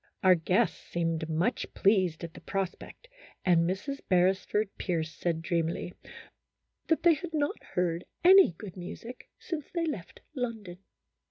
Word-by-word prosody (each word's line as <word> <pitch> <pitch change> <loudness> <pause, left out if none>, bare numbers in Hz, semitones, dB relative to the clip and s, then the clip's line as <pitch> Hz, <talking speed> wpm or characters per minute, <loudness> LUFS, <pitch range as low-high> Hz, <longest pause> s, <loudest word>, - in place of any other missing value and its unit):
Our 185 -1 +8
guests 180 +2 +1
seemed 165 -1 -2
much 175 +10 0
pleased 185 -5 +2
at 165 -1 -6
the - - -12
prospect, 195 - -5 0.4
and 170 -2 +4
Mrs. 275 +10 -3
Beresford 190 +3 +2
Pierce 160 -3 -1
said, 165 -2 -2
dreamily, 170 +1 -1 0.5
" - - -52
that 325 - +2
they 340 -1 +7
had 320 +2 -5
not 290 -1 -1
heard 175 -1 0 0.2
any 380 - +8
good 185 +2 -10
music 225 +7 -9
since 315 -5 -5
they 340 -2 -1
left 215 - -5
London." 225 - -4
185 Hz, 145 wpm, -29 LUFS, 170-250 Hz, 0.5 s, Our